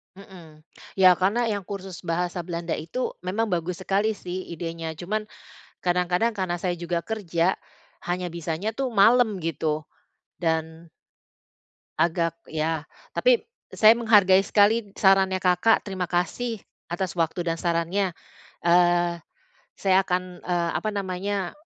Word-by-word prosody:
Mhm. 175 -6 -14 0.3
Ya 185 -1 +7
karena 225 +5 +1
yang 205 -2 -2
kursus 190 -3 -7
bahasa 175 +2 -1
Belanda 170 -1 -3
itu 210 +11 -3
memang 205 +5 -2
bagus 175 +1 -2
sekali 205 +3 +1
sih 185 -1 -6
idenya, 165 -1 -5
cuman 210 +6 -3 0.5
kadang-kadang 180 +5 +1
karena 185 -2 -1
saya 180 -2 -1
juga 170 0 -2
kerja, 175 -2 -1 0.5
hanya 180 0 -2
bisanya 170 +4 -3
tuh 265 -2 -2
malem 220 -1 +4
gitu, 155 -1 -2 0.6
dan 160 0 -2 1.1
agak 165 0 +1
ya 160 0 -2 0.3
tapi - - +3 0.3
saya 220 +2 +6
menghargai 205 -5 +5
sekali 210 0 +3
sarannya 190 -1 +3
Kakak, 180 +5 +3
terima 190 -3 -3
kasih 205 +6 -2 0.3
atas 175 +1 -3
waktu 165 +2 0
dan 165 -1 -1
sarannya. 175 +2 0 0.5
Eee, 175 0 +3 0.6
saya 190 -1 +2
akan, 180 -1 -2
eee, 175 -1 -1
apa 215 - -3
namanya 195 -1 -2
180 Hz, 125 wpm, -25 LUFS, 170-200 Hz, 1.1 s, Ya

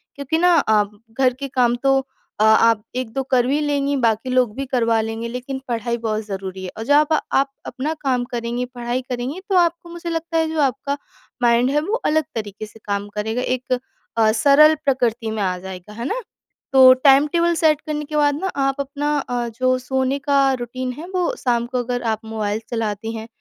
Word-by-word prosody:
क्योंकि 280 +3 -1
ना, 355 +2 +4
आप 210 -5 +2 0.3
घर 255 -1 +4
के 275 - -2
काम 250 -3 +2
तो 270 0 +4 0.4
अ, - - +6
आप 220 0 +5
1-2 255 0 -2
कर 250 -2 +3
भी 285 +3 +1
लेंगी, 285 -1 0
बाकी 225 +2 +1
लोग 255 -4 +2
भी 275 - -3
करवा 230 -4 +1
लेंगे, 225 +1 -4
लेकिन 250 +2 -5
पढ़ाई 235 0 -2
बहुत 215 -1 -1
ज़रूरी 190 -2 -6
है। 185 - -4
और 225 - -4
जब 290 +3 +4 0.2
आप 275 0 +2
अपना 295 +5 -3
काम 255 -3 +1
करेंगी, 240 +1 -2
पढ़ाई 245 0 -3
करेंगी, 250 +6 -3
तो 390 - +1
आपको, 345 -1 +2
मुझे 340 0 -6
लगता 330 0 -2
है, 320 0 +2
जो 320 - -2
आपका 280 +1 0 0.5
माइंड 240 +1 +4
है, 295 - +2
वो 405 +9 -1 0.2
अलग 315 0 +2
तरीके 215 -1 -5
से 215 +1 -16
काम 200 0 -2
करेगा। 220 +3 -1
एक 255 +1 -1 0.4
अ, 215 -1 +5
सरल 285 +7 +6
प्रकृति 240 -4 0
में 220 -1 -3
आ 185 -1 -1
जाएगा। 190 +2 -9
है 235 +2 -6
ना? 455 - -2 0.5
तो 260 -1 +9
टाइम 275 +2 +5
टेबल 340 0 +3
सेट 305 -1 +4
करने 300 -1 -4
के 305 +1 -6
बाद 290 -1 +3
ना, 380 - -1 0.2
आप 275 +1 -2
अपना 290 +2 -2
अ, 245 -3 -3
जो 255 0 +3
सोने 265 +1 0
का 280 0 +4 0.2
रूटीन 255 +2 -4
है, 335 - -7
वो 360 -2 0
शाम 235 -1 +2
को 255 - -3
अगर 245 0 -3
आप 220 +1 -7
मोबाइल 215 -1 -2
चलाती 225 -1 -3
हैं, 220 0 -7
255 Hz, 200 wpm, -21 LUFS, 225-285 Hz, 0.5 s, तो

